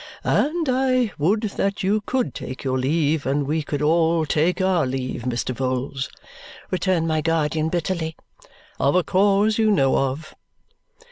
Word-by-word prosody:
"And 320 +2 +1
I 255 -3 +2
would 195 +9 +2
that 200 -2 -2
you 205 +3 +1
could 255 +3 -1
take 130 - -7
your 130 -1 0
leave, 150 +2 0
and 140 +1 0
we 155 +3 0
could 145 0 -3
all 165 +1 +2
take 160 +4 +1
our 185 -6 +2
leave, 130 -1 -3
Mr. 125 0 -2
Vholes," 130 +1 -2 0.6
returned 185 -3 +1
my 155 -1 +1
guardian 160 -1 0
bitterly, 165 -1 -2 0.6
"of 140 - +2
a 180 - +4
cause 205 +4 +2
you 220 -1 +3
know 135 -10 +3
of." 135 +3 -2
160 Hz, 150 wpm, -22 LUFS, 140-195 Hz, 0.6 s, a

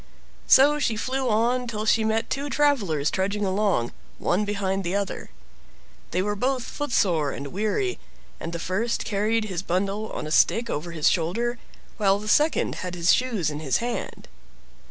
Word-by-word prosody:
So 290 +3 +6
she 235 -6 0
flew 260 +3 -1
on 240 +3 +1
till 215 -2 -3
she 220 +1 +3
met 220 +1 0
two 280 +2 -2
travelers 205 - +1
trudging 200 +2 -1
along, 190 - +1 0.3
one 195 +4 0
behind 195 -1 -1
the 175 +2 -2
other. 200 -1 -3 0.8
They 180 +2 0
were 205 +1 -1
both 255 +3 0
foot 290 +2 -5
sore 165 -10 +2
and 140 +1 -5
weary, 220 - -1 0.4
and 165 - -5
the 170 - -3
first 195 +8 -1
carried 215 +2 0
his 185 -5 -3
bundle 195 +4 -2
on - - -4
a 155 - -5
stick 230 +8 +3
over 155 +4 -3
his 160 -3 0
shoulder, 230 +9 0 0.4
while 195 -2 +3
the 210 +1 -8
second 300 +8 +2
had 180 -1 -4
his 170 0 +4
shoes 220 - 0
in 150 - -5
his 145 -4 +1
hand. 240 0 -4
205 Hz, 175 wpm, -25 LUFS, 180-235 Hz, 0.8 s, So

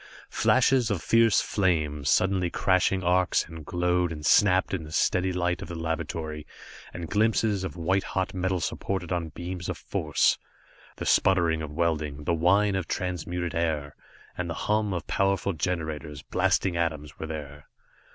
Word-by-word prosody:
Flashes 130 -2 +3
of 100 -4 0
fierce 115 -2 +4
flame, 80 -7 0
sudden 95 +2 +2
crashing 95 +1 +1
arcs 90 +1 +2
that 80 -1 -10
glowed 90 +1 0
and 75 -2 -6
snapped 95 +1 +4
in 90 -4 -2
the 75 - -10
steady 90 +4 +1
light 90 0 -1
of - - -6
the 85 - -6
laboratory, 80 -1 -4 0.4
and 85 -1 -6
glimpses 105 0 +1
of 95 - -5
white 95 +3 +1
hot 95 +1 -3
metal 95 0 -1
supported 95 +1 -3
on 85 -2 -1
beams 85 +3 -6
of - - -3
force. 75 -2 +1 0.6
The - - -6
sputter 90 -3 +3
of 80 -2 -5
welding, 75 -3 -1
the 85 - 0
whine 100 +5 +3
of 95 -3 -2
transmuted 90 -1 -3
air, 80 -4 -1 0.4
and - - -3
the - - -3
hum 105 -1 +1
of 85 -2 -3
powerful 100 0 0
generators, 80 -3 -3
blasting 90 -3 +1
atoms 75 -4 -3
were 80 - -4
there. 75 -2 -7
90 Hz, 160 wpm, -27 LUFS, 80-95 Hz, 0.6 s, fierce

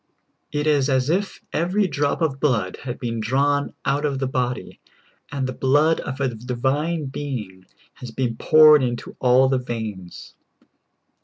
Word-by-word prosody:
It 150 0 -1
is 145 -3 +2
as 130 +2 +1
if 195 +3 -1
every 185 +5 +1
drop 145 +1 -1
of 140 -4 -1
blood 115 -11 0
had 125 -2 -6
been 115 -2 -4
drawn 140 +5 0
out 140 +2 0
of 140 -2 0
the 135 - -1
body, 125 -1 -3 0.5
and 140 -2 -2
the 130 - -3
blood 145 +6 +2
of 130 0 -5
a 135 -1 +1
divine 135 +7 -2
being 115 -10 -6 0.3
had 115 -3 -10
been 125 -3 -1
poured 155 +3 +6
into 120 -2 -3
all 130 +1 +4
the 130 -1 +1
veins. 110 -7 -7
135 Hz, 155 wpm, -22 LUFS, 125-145 Hz, 0.5 s, poured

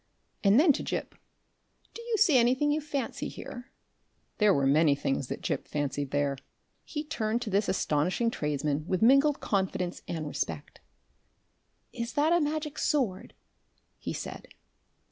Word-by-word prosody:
And 200 +4 +6
then 305 -1 +6
to - - -3
Gip, - - -4 0.8
"Do 465 - -8
you 465 -1 -1
see 345 -9 +4
anything 255 +4 +4
you 305 +1 0
fancy 285 -4 -3
here?" 245 +2 -9 0.7
There 210 -1 +5
were 140 -7 +2
many 145 +1 +4
things 135 -1 -2
that - - -6
Gip - - -2
fancied 145 -1 -2
there. 140 -1 0 0.4
He 300 -1 -5
turned 235 -6 -2
to 215 - -5
this 200 +2 +1
astonishing 185 +7 +1
tradesman 150 -1 -2
with 185 +2 0
mingled 275 +4 +5
confidence 190 -3 -1
and 160 -2 -3
respect. 80 - -4 1.1
"Is 235 0 -4
that 305 +3 +3
a 345 - +4
Magic 300 0 -2
Sword?" 245 -11 -1 0.6
he - - -4
said. - - -6
215 Hz, 145 wpm, -29 LUFS, -, 1.1 s, And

